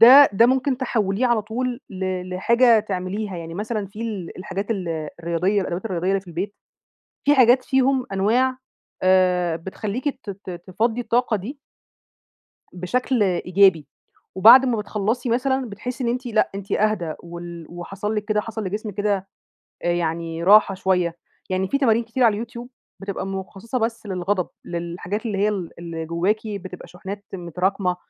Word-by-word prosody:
ده 265 +5 +10
ده 230 +4 +5
ممكن 265 +1 +2
تحوليه 220 -2 0
على 235 -3 +2
طول 245 +3 -3
ل 185 -1 -3
لحاجة 235 +4 +4
تعمليها، 195 0 -4
يعني 165 0 -7
مثلًا 210 0 -3
في 210 +4 -8
ال 205 -7 -5
الحاجات 195 +3 -4
ال 165 -6 -3
الرياضية 175 +5 +1
الأدوات 180 +2 -3
الرياضية 180 -2 -2
اللي 195 0 +2
في 190 - -24
البيت، 185 +5 -4 0.7
في 290 - +5
حاجات 255 0 +5
فيهم 265 -1 +2
أنواع 245 +7 +2 0.4
آآ 180 -2 +3
بتخلّيكِ 210 - -4
ت 205 - -6
ت 195 -1 -9
تفِضِّي 190 +7 -2
الطاقة 235 -2 +1
دي 245 +10 -7 1.2
بشكل 230 +6 0
إيجابي، 180 -4 +3 0.5
وبعد 235 +7 +9
ما 245 -3 +1
بتخلّصي 215 +4 -2
مثلًا، 260 0 0
بتحِسّي 250 +5 -5
إن 235 - +1
أنتِ 255 +2 -2
لأ، 230 -3 +2
أنتِ 200 0 -7
أهدى، 205 -7 +1
وال 170 -1 -8
وحصل 195 +5 -4
لِك 210 -1 -2
كده 210 0 +1
حصل 220 0 -5
لجسم 210 +2 -4
كده 200 -1 -1 0.6
آآ 175 - +1
يعني 165 -1 -2
راحة 200 +1 +6
شوية، 180 -3 0 0.3
يعني 185 0 0
في 275 - +1
تمارين 230 -4 +3
كتير 240 +3 -2
على 225 - +6
اليوتيوب 235 +3 -6 0.3
بتبقى 195 -1 -4
مُخصّصة 195 +5 -4
بس 225 -1 -2
للغضب، 185 0 -1 0.2
للحاجات 175 +5 -4
اللي 205 -3 -2
هي 205 +2 +3
ال 190 -5 -3
اللي 165 -1 -5
جُوَّاكِ 180 +6 0
بتبقى 185 -3 -7
شُحنات 200 +3 -8
متراكمة، 180 +1 -1
200 Hz, 160 wpm, -23 LUFS, 180-230 Hz, 1.2 s, ده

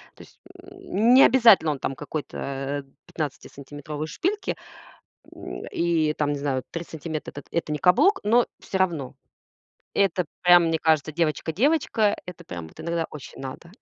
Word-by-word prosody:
То - - -13
есть, - - -21 0.2
м, 375 - 0
не 265 - +9
обязательно 225 -11 +6
он 140 - -4
там 135 - -3
какой-то 140 -1 -4 0.2
пятнадцатисантиметровой 145 0 -6
шпильки, 395 - -2 0.8
м, - - -7
и 165 -3 +2
там, 145 -1 0
не 145 - -3
знаю, 135 -2 -1
3 170 0 -4
сантиметра- 160 -1 -6
эт 145 - -10
это 165 -2 -1
не 150 - -1
каблук. 190 - +4
Но 235 +3 +4
всё 190 - -3
равно- 165 -8 -1 0.8
это 185 -3 +2 0.2
прям, 175 -1 +7
мне 160 0 +1
кажется, 155 -1 +2
девочка-девочка, 205 - +1
это 180 - -9
прям 85 -3 -7
вот 160 - -14
иногда 170 0 -2
очень 145 -3 -10
надо. 135 +6 -8
160 Hz, 150 wpm, -25 LUFS, 145-190 Hz, 0.8 s, не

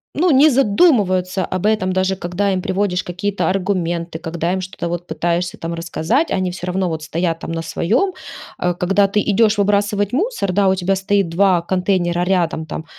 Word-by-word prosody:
ну, 350 +5 +2
не 285 +3 +6
задумываются 200 - +2
об 185 - -2
этом 210 -3 +1
даже 185 +1 0
когда 185 +2 -1
им 185 - -1
приводишь 185 -1 -1
какие 185 +3 -3
то 200 - -3
аргументы, 175 -3 -2
когда 170 +1 -2
им 190 - -2
что-то 185 -2 -5
вот 175 +1 -4
пытаешься 175 +1 -1
там 165 +1 -5
рассказать, 170 - -1
они 185 -1 0
всё 180 0 -7
равно 185 0 0
вот 160 -1 -4
стоят 165 +1 -2
там - - -6
на 165 0 -3
своем. 240 - 0 0.5
Э, 180 0 +1
когда 195 +3 +1
ты 210 +1 +1
идешь 215 +1 +3
выбрасывать 205 0 +1
мусор, 360 - -1
да, 200 +1 +3
у 190 - +2
тебя 190 +1 0
стоит 195 -1 0
2 180 0 +3
контейнера 180 -1 0
рядом: 175 -4 0
там 160 +1 -6
185 Hz, 190 wpm, -19 LUFS, 175-205 Hz, 0.5 s, не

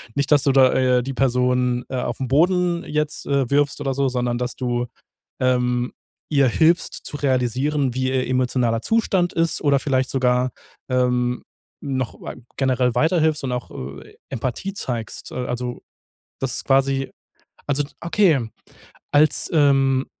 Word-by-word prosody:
nicht, 140 +1 -1
dass 145 -2 +4
du 140 - +3
da, 130 -1 +5
äh, 125 -1 +3
die 135 +2 -4
Person, 125 -1 +1
äh, 130 - -4
auf 120 -2 -3
'n 130 - -1
Boden 175 +4 +2
jetzt, 150 0 -2
äh, 140 -3 0
wirfst 145 0 +1
oder 135 -2 -1
so, 140 +1 +1
sondern 125 -1 -1
dass 125 0 -3
du, 120 -1 -1 0.5
ähm, 125 -1 +1 0.4
ihr 140 -3 +3
hilfst 165 +6 +3
zu - - -3
realisieren, 130 0 0
wie 130 0 0
ihr 130 -1 0
emotionaler 125 -2 +1
Zustand 195 -6 +1
ist 165 -1 0
oder 140 -3 +3
vielleicht 130 -2 0
sogar, 125 -1 +1 0.4
ähm, 125 -1 +1 0.4
noch 130 - -3
wei - - -7 0.2
generell 125 -2 +1
weiterhilfst 155 +1 +2
und 125 - -2
auch, 125 0 -5
äh, 70 +2 -9
Empathie 130 - -3
zeigst. 120 - -5
Äh, - - -8
also 125 0 -4 0.6
das 135 -2 0
quasi 135 0 +1 0.6
also 145 0 +1 0.2
okay 170 - +2 0.7
als, 150 0 +3
ähm, 135 -3 +3
130 Hz, 150 wpm, -22 LUFS, 125-145 Hz, 0.7 s, da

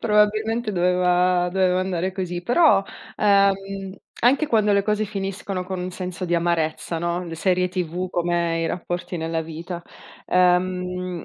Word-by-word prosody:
Probabilmente 215 +1 +2
doveva 180 0 +2
doveva 185 -1 +2
andare 185 0 -2
così. 180 -2 -4
Però, 245 - +4 0.3
ehm, 195 -1 +1 0.2
anche 275 +6 +3
quando 215 -4 +2
le 200 - +3
cose 210 0 +1
finiscono 195 -2 -4
con 185 -1 -4
un 180 - -4
senso 185 0 -5
di 175 -1 0
amarezza, 165 -1 -1
no, 170 +2 -2
le 165 -1 -6
serie 180 +2 +1
TV 180 0 -3
come 170 -1 0
i - - 0
rapporti 175 +1 -4
nella 165 0 -2
vita, 165 +2 -7 0.4
ehm, 180 0 +1
180 Hz, 145 wpm, -23 LUFS, 175-195 Hz, 0.4 s, Però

